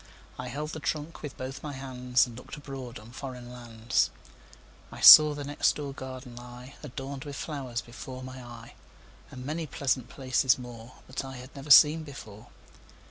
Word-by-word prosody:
I -, -, -5 dB
held 150 Hz, +2 st, -4 dB
the 160 Hz, -, -6 dB
trunk 155 Hz, +2 st, -4 dB
with 145 Hz, -3 st, -7 dB
both 135 Hz, +1 st, -6 dB
my 145 Hz, -2 st, -6 dB
handsAnd 125 Hz, -2 st, 0 dB
looked 125 Hz, -, -9 dB
abroad 135 Hz, -4 st, -8 dB
on 110 Hz, +2 st, -13 dB
foreign 125 Hz, -2 st, -8 dB
lands.I 120 Hz, -1 st, -5 dB
saw 150 Hz, -1 st, +11 dB
the 145 Hz, -, -5 dB
next 145 Hz, +1 st, +1 dB
door 145 Hz, -2 st, -5 dB
garden 130 Hz, -2 st, -8 dB
lie, 125 Hz, +2 st, -11 dB
Adorned 135 Hz, -1 st, -7 dB
with 145 Hz, -2 st, -7 dB
flowers, 130 Hz, -7 st, -4 dB
before 130 Hz, +2 st, -9 dB
my 130 Hz, 0 st, -9 dB
eye, 120 Hz, -1 st, -11 dB, 0.6 s
And 125 Hz, 0 st, -9 dB
many 155 Hz, +2 st, -3 dB
pleasant 130 Hz, -3 st, -1 dB
places 130 Hz, 0 st, +2 dB
moreThat 125 Hz, +1 st, -9 dB
I 135 Hz, 0 st, -8 dB
had 125 Hz, +3 st, -12 dB
never 140 Hz, +1 st, -9 dB
seen 150 Hz, +2 st, +8 dB
before. 120 Hz, -6 st, -11 dB
130 Hz, 160 wpm, -28 LUFS, 125-140 Hz, 0.6 s, saw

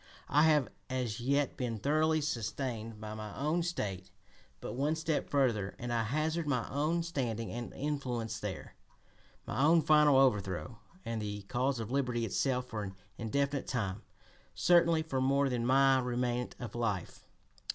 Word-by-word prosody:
I 150 Hz, +2 st, +5 dB
have 150 Hz, -5 st, +4 dB, 0.2 s
as 125 Hz, -4 st, -2 dB
yet 140 Hz, +3 st, +1 dB
been 120 Hz, -3 st, -2 dB
thoroughly 155 Hz, +6 st, +2 dB
sustained 115 Hz, -4 st, -3 dB
by 110 Hz, 0 st, -6 dB
my 110 Hz, -1 st, -7 dB
own 155 Hz, +5 st, +1 dB
State, 100 Hz, -, -3 dB, 0.5 s
but -, -, -6 dB
one 145 Hz, +5 st, 0 dB
step 160 Hz, -1 st, -1 dB
further 115 Hz, -9 st, +1 dB
and 120 Hz, 0 st, -4 dB
I 115 Hz, -, +2 dB
hazard 155 Hz, +6 st, -1 dB
my 125 Hz, -5 st, 0 dB
own 155 Hz, +4 st, +1 dB
standing 120 Hz, -9 st, -2 dB
and 120 Hz, 0 st, -5 dB
influence 125 Hz, -6 st, -2 dB
there, 105 Hz, -3 st, -6 dB, 0.7 s
my -, -, -2 dB
own 160 Hz, +2 st, +5 dB
final 150 Hz, -2 st, +6 dB
overthrow, 105 Hz, -, +1 dB, 0.3 s
and 115 Hz, -1 st, -2 dB
the 105 Hz, -1 st, -4 dB
cause 125 Hz, +5 st, 0 dB
of 115 Hz, +1 st, -5 dB
liberty 125 Hz, -4 st, 0 dB
itself 125 Hz, +4 st, 0 dB
for 110 Hz, -4 st, -5 dB
an 95 Hz, -2 st, -6 dB, 0.2 s
indefinite 140 Hz, +4 st, -1 dB
time, 105 Hz, -5 st, -2 dB, 0.5 s
certainly 170 Hz, -2 st, +4 dB
for 135 Hz, -5 st, -2 dB
more 140 Hz, +1 st, +3 dB
than 120 Hz, -2 st, -1 dB
my 135 Hz, 0 st, +5 dB
remnant 125 Hz, 0 st, -1 dB
of 120 Hz, -, -6 dB
life. 110 Hz, -7 st, -3 dB
125 Hz, 155 wpm, -32 LUFS, 115-145 Hz, 0.7 s, final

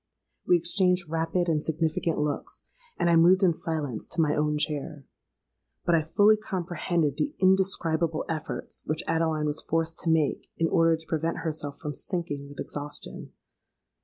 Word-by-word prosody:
We 180 Hz, -, +6 dB
exchanged 180 Hz, 0 st, +1 dB
rapid 165 Hz, +2 st, 0 dB
and 155 Hz, -2 st, +1 dB
significant 160 Hz, +1 st, -1 dB
looks; 150 Hz, -1 st, -3 dB, 0.3 s
and -, -, +1 dB
I 170 Hz, -, +5 dB
moved 180 Hz, +4 st, +5 dB
in 175 Hz, -3 st, +5 dB
silence 150 Hz, -8 st, -3 dB
to -, -, -6 dB
my 150 Hz, -2 st, +3 dB
own 150 Hz, 0 st, +1 dB
chair. 150 Hz, -1 st, -2 dB, 0.8 s
But 175 Hz, -, +2 dB
I 165 Hz, -, +4 dB
fully 205 Hz, +7 st, +4 dB
comprehended 175 Hz, -6 st, -2 dB
the 295 Hz, +1 st, -1 dB
indescribable 175 Hz, -4 st, +2 dB
efforts 160 Hz, -2 st, -4 dB
which 155 Hz, +1 st, -1 dB
Adeline 160 Hz, -2 st, 0 dB
was 150 Hz, +1 st, -1 dB
forced 165 Hz, 0 st, -1 dB
to 165 Hz, -, -1 dB
make 160 Hz, -3 st, +1 dB
in 165 Hz, -, +2 dB
order 165 Hz, -1 st, +3 dB
to 160 Hz, -, -7 dB
prevent 165 Hz, +1 st, -1 dB
herself 150 Hz, -3 st, -2 dB
from 150 Hz, -, -5 dB
sinking 145 Hz, -5 st, -4 dB
with 145 Hz, -, -12 dB
exhaustion. 145 Hz, 0 st, -5 dB
165 Hz, 160 wpm, -27 LUFS, 150-175 Hz, 0.8 s, We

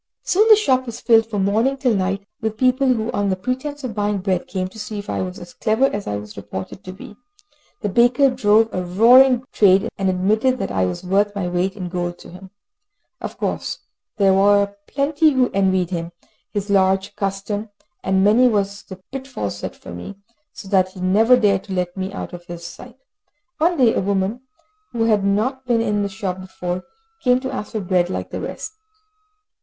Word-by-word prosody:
Soon, 420 Hz, +4 st, +3 dB
the 435 Hz, -, +10 dB
shop 260 Hz, -11 st, +1 dB
was 230 Hz, -, -6 dB
filled 225 Hz, -1 st, +4 dB
from 205 Hz, -4 st, -1 dB
morning 225 Hz, +7 st, +1 dB
till 255 Hz, -3 st, +1 dB
night, 195 Hz, 0 st, -1 dB, 0.2 s
with 220 Hz, -1 st, -2 dB
people 255 Hz, +2 st, +2 dB
who 225 Hz, -1 st, -1 dB
on 205 Hz, -1 st, 0 dB
the 190 Hz, -, +1 dB
pretence 260 Hz, +8 st, -4 dB
of 250 Hz, -4 st, -4 dB
buying 205 Hz, 0 st, 0 dB
bread 185 Hz, -2 st, -1 dB
came 185 Hz, 0 st, -3 dB
to 205 Hz, +4 st, -13 dB
see 215 Hz, 0 st, -5 dB
if 205 Hz, 0 st, -5 dB
I -, -, -2 dB
was 185 Hz, 0 st, -5 dB
as 175 Hz, 0 st, -11 dB
clever 220 Hz, +5 st, +1 dB
as 205 Hz, -6 st, -2 dB
I 105 Hz, -, -2 dB
was 105 Hz, 0 st, -9 dB
reported 100 Hz, -, -7 dB
to 185 Hz, -, -7 dB
be. 210 Hz, +3 st, -11 dB, 0.7 s
The 210 Hz, -, -1 dB
baker 245 Hz, +6 st, +4 dB
drove 225 Hz, -2 st, +3 dB
a 185 Hz, -, -1 dB
roaring 245 Hz, +7 st, +5 dB
trade, 195 Hz, -1 st, +4 dB
and 195 Hz, -1 st, +1 dB
admitted 215 Hz, +8 st, +1 dB
that -, -, -3 dB
I 95 Hz, -1 st, +1 dB
was 90 Hz, -, -5 dB
worth 200 Hz, +3 st, +1 dB
my 195 Hz, -3 st, -2 dB
weight 180 Hz, +2 st, -1 dB
in 185 Hz, -3 st, -4 dB
gold 175 Hz, -1 st, -3 dB
to -, -, -13 dB
him. 185 Hz, +2 st, -12 dB, 0.7 s
Of -, -, -6 dB
course -, -, -3 dB, 0.4 s
there 195 Hz, -2 st, +4 dB
were 200 Hz, +1 st, +3 dB
plenty 295 Hz, +2 st, +2 dB
who 255 Hz, -2 st, +2 dB
envied 190 Hz, -2 st, +1 dB
him 170 Hz, -1 st, -3 dB, 0.4 s
his 205 Hz, 0 st, -3 dB
large 195 Hz, +1 st, +2 dB
custom, 200 Hz, +2 st, -3 dB, 0.3 s
and 190 Hz, 0 st, +2 dB
many 225 Hz, +5 st, +5 dB
was 200 Hz, -3 st, 0 dB
the 190 Hz, -2 st, -12 dB
pitfall 265 Hz, -, -4 dB
set 100 Hz, -, -6 dB
for -, -, -11 dB
me, 90 Hz, -, -8 dB, 0.4 s
so 195 Hz, -, -11 dB
that 185 Hz, -1 st, +2 dB
he 190 Hz, -, -11 dB
never 215 Hz, +7 st, +4 dB
dared 200 Hz, -4 st, +2 dB
to 195 Hz, -, -6 dB
let 180 Hz, -1 st, -2 dB
me 190 Hz, 0 st, -4 dB
out 195 Hz, -, -6 dB
of 175 Hz, 0 st, -9 dB
his 170 Hz, -1 st, -8 dB
sight. 250 Hz, +6 st, -11 dB, 0.6 s
One 340 Hz, +2 st, +2 dB
day 245 Hz, -5 st, +4 dB
a -, -, 0 dB
woman, 200 Hz, +4 st, -1 dB, 0.5 s
who 230 Hz, -1 st, 0 dB
had 215 Hz, -3 st, +2 dB
not 245 Hz, +7 st, 0 dB
been 240 Hz, -2 st, +2 dB
in 210 Hz, -2 st, 0 dB
the 200 Hz, -, -1 dB
shop 190 Hz, -1 st, -4 dB
before, 180 Hz, -1 st, -5 dB, 0.4 s
came 250 Hz, -1 st, +4 dB
to 265 Hz, -, -4 dB
ask 210 Hz, -, -5 dB
for 215 Hz, -, -2 dB
bread, 180 Hz, -2 st, +1 dB
like -, -, -4 dB
the -, -, -4 dB
rest. -, -, -6 dB
200 Hz, 205 wpm, -21 LUFS, 185-235 Hz, 0.7 s, the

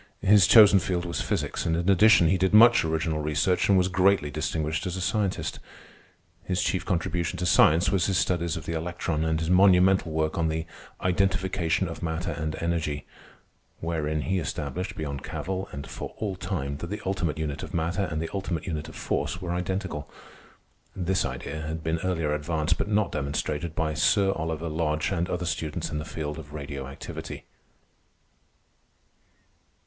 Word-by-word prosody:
His 100 Hz, -1 st, +6 dB
chosen 105 Hz, -3 st, +8 dB
field 90 Hz, -1 st, -2 dB
was 85 Hz, -, -3 dB
physics, -, -, -2 dB
and 80 Hz, 0 st, 0 dB
in 85 Hz, +1 st, -2 dB
addition 100 Hz, -2 st, +6 dB
he 95 Hz, +3 st, +3 dB
did 95 Hz, +3 st, +2 dB
much 115 Hz, +2 st, +7 dB
original 80 Hz, -1 st, -1 dB
research 75 Hz, +6 st, +1 dB
and 100 Hz, -, +6 dB
was 90 Hz, 0 st, +3 dB
greatly 95 Hz, -4 st, +2 dB
distinguished 80 Hz, +5 st, -2 dB
as 90 Hz, +1 st, -3 dB
a -, -, -3 dB
scientist. 100 Hz, +1 st, -1 dB, 0.8 s
His 90 Hz, -1 st, -1 dB
chief 90 Hz, -2 st, 0 dB
contribution 85 Hz, -2 st, -1 dB
to 90 Hz, -, -2 dB
science 80 Hz, +1 st, +5 dB
was 95 Hz, -3 st, +2 dB
his 95 Hz, -2 st, +1 dB
studies 85 Hz, -2 st, 0 dB
of 80 Hz, -, -7 dB
the 85 Hz, -, -3 dB
electron 80 Hz, -1 st, -2 dB
and 80 Hz, -1 st, 0 dB
his 80 Hz, +1 st, -1 dB
monumental 95 Hz, -2 st, +5 dB
work 80 Hz, +1 st, -1 dB
on 80 Hz, -, +2 dB
the 80 Hz, +1 st, -2 dB, 0.4 s
"Identification 95 Hz, -1 st, +1 dB
of 80 Hz, -, -7 dB
Matter 80 Hz, +1 st, -2 dB
and 80 Hz, 0 st, -3 dB
Energy," 80 Hz, -4 st, -2 dB, 0.7 s
wherein 80 Hz, -2 st, -2 dB
he 95 Hz, +4 st, 0 dB
established, 80 Hz, +2 st, -4 dB
beyond 70 Hz, -3 st, -4 dB
cavil 95 Hz, 0 st, -4 dB
and 70 Hz, 0 st, -6 dB
for -, -, -7 dB
all 100 Hz, -3 st, -3 dB
time, 90 Hz, -8 st, -3 dB
that 85 Hz, +3 st, -6 dB
the 105 Hz, -, -5 dB
ultimate 90 Hz, -5 st, -1 dB
unit 75 Hz, -2 st, -3 dB
of -, -, -7 dB
matter 85 Hz, +3 st, -1 dB
and 80 Hz, -3 st, -3 dB
the 80 Hz, -, -3 dB
ultimate 95 Hz, -5 st, -3 dB
unit 75 Hz, -3 st, -4 dB
of -, -, -12 dB
force 85 Hz, -, -2 dB
were 90 Hz, -2 st, -3 dB
identical. 90 Hz, -4 st, -3 dB, 0.9 s
This 95 Hz, 0 st, 0 dB
idea 80 Hz, -, -5 dB
had 80 Hz, +1 st, -5 dB
been 80 Hz, +1 st, -1 dB
earlier 80 Hz, -4 st, -1 dB
advanced, 75 Hz, +1 st, -1 dB
but -, -, 0 dB
not 105 Hz, 0 st, +1 dB
demonstrated, 75 Hz, +3 st, -3 dB
by 80 Hz, -1 st, 0 dB
Sir 95 Hz, +5 st, +3 dB
Oliver 80 Hz, -2 st, -3 dB
Lodge 75 Hz, 0 st, -1 dB
and 85 Hz, -2 st, -1 dB
other 90 Hz, 0 st, -2 dB
students 75 Hz, -1 st, -3 dB
in 75 Hz, -, -2 dB
the 75 Hz, -, -5 dB
new -, -, -11 dB
field 75 Hz, 0 st, -4 dB
of 75 Hz, -2 st, -11 dB
radio 70 Hz, -2 st, -6 dB
activity. 70 Hz, -, -8 dB
85 Hz, 175 wpm, -26 LUFS, 80-95 Hz, 0.9 s, chosen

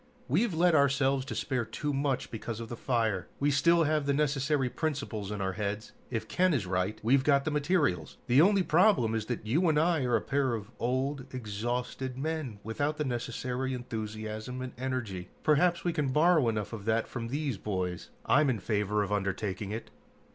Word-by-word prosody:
We've 195 Hz, -, +2 dB
let 175 Hz, +1 st, +4 dB
ourselves 140 Hz, -2 st, +3 dB
despair 130 Hz, -4 st, -1 dB
too 145 Hz, +6 st, -3 dB
much 135 Hz, -1 st, -1 dB
because 115 Hz, 0 st, -5 dB
of 115 Hz, -1 st, -6 dB
the 120 Hz, -, -4 dB
fire. 110 Hz, -7 st, 0 dB
We 145 Hz, +1 st, +2 dB
still 170 Hz, +5 st, +4 dB
have 155 Hz, -2 st, +1 dB
the 140 Hz, -, +2 dB
necessary 145 Hz, -1 st, +1 dB
principles 140 Hz, -8 st, -3 dB
in 105 Hz, -1 st, -4 dB
our 95 Hz, 0 st, 0 dB
heads. 105 Hz, +2 st, -3 dB, 0.2 s
If 110 Hz, -2 st, -3 dB
Ken 185 Hz, +3 st, +2 dB
is 110 Hz, -8 st, -1 dB
right, 95 Hz, +3 st, -1 dB
we've 130 Hz, +4 st, +4 dB
got 140 Hz, -1 st, +3 dB
the 155 Hz, -, 0 dB
materials. 150 Hz, -, 0 dB
The 130 Hz, +4 st, +5 dB
only 195 Hz, +2 st, +5 dB
problem 160 Hz, -, +4 dB
is 110 Hz, -1 st, -2 dB
that 120 Hz, -3 st, -3 dB
you 160 Hz, +11 st, +2 dB
and 155 Hz, -, +2 dB
I 160 Hz, -2 st, +3 dB
are 125 Hz, -, +2 dB
a -, -, +2 dB
pair 135 Hz, -3 st, 0 dB
of 105 Hz, 0 st, -7 dB
old, 130 Hz, +2 st, -1 dB
exhausted 125 Hz, +3 st, -3 dB
men, 150 Hz, -6 st, -3 dB
without 145 Hz, +7 st, -1 dB
the 150 Hz, -, -1 dB
necessary 125 Hz, +1 st, -2 dB
enthusiasm 110 Hz, 0 st, -5 dB
and 130 Hz, -, -6 dB
energy. 120 Hz, -9 st, -4 dB
Perhaps 170 Hz, +3 st, +3 dB
we 175 Hz, -, 0 dB
can 150 Hz, -4 st, 0 dB
borrow 150 Hz, -1 st, +4 dB
enough 110 Hz, 0 st, -3 dB
of 105 Hz, -3 st, -6 dB
that 110 Hz, 0 st, +1 dB
from 115 Hz, -2 st, -5 dB
these 135 Hz, -4 st, -2 dB
boys. 90 Hz, -4 st, -3 dB, 0.2 s
I'm 145 Hz, +1 st, +4 dB
in 125 Hz, -, +1 dB
favor 105 Hz, +1 st, 0 dB
of 100 Hz, -, -5 dB
undertaking 100 Hz, 0 st, -2 dB
it!" 110 Hz, +2 st, -6 dB
130 Hz, 190 wpm, -30 LUFS, 110-145 Hz, 0.2 s, The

